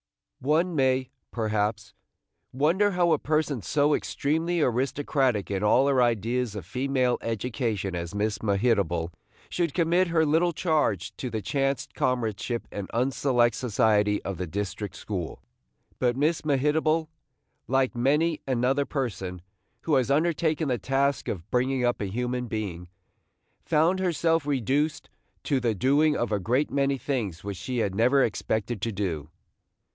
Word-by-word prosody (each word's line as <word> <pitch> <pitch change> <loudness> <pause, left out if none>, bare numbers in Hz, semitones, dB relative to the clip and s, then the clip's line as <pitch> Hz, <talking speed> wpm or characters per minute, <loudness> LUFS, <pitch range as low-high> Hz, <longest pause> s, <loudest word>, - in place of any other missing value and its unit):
One 160 +6 +1
may, 130 -2 +1 0.2
perhaps, 110 -1 -2 0.6
wonder 165 +10 +2
how 175 -1 +2
a - - +3
person 155 -4 0
so 145 - +2
extremely 160 +6 0
aristocratic 130 -4 0
in 95 -1 -1
all 115 +6 +4
her 135 -2 +3
ideas 120 0 0
of 100 -6 -6
female 125 +3 0
education 115 -4 -2
as 85 +2 -5
Miss 105 0 -1
Mehitable 100 -6 +1 0.4
should 170 -4 -1
commit 175 +2 +3
her 165 -1 +2
little 165 +3 +2
charge 150 - 0
to 130 - -4
the 110 -2 -4
chance 135 -1 0
comradeship 120 -1 -1
and 100 -2 -5
unselect 125 -1 +2
society 105 -3 +2
of 95 -3 -5
the 90 - -3
district 100 +2 -4
school. 90 -6 -5 0.6
But 125 -1 +1
Miss 155 +4 +1
Mehitable, 155 +3 +1 0.6
like 135 0 +1
many 150 +6 +1
another 130 +2 +1
person 95 - -4 0.4
who 160 - -1
has 130 -2 +3
undertaken 155 0 +1
the 125 -2 0
task 135 +4 0
of 90 -2 -4
bringing 125 0 +1
up 120 -2 0
a - - -1
human 125 +4 -2
being, 100 -6 -4 0.8
found 165 +5 +2
herself 165 -3 +1
reduced 145 +3 0 0.3
to 140 -3 +1
the 115 -3 0
doing 145 +8 +3
of 120 - -1
a 105 - +1
great 125 +10 0
many 140 0 +1
things 110 - -3
which 100 -1 -5
she 125 +7 -4
had 100 -5 0
never 125 +6 +4
expected 110 0 -2
to 115 - -1
do. 85 -7 -3
125 Hz, 145 wpm, -26 LUFS, 105-145 Hz, 0.8 s, all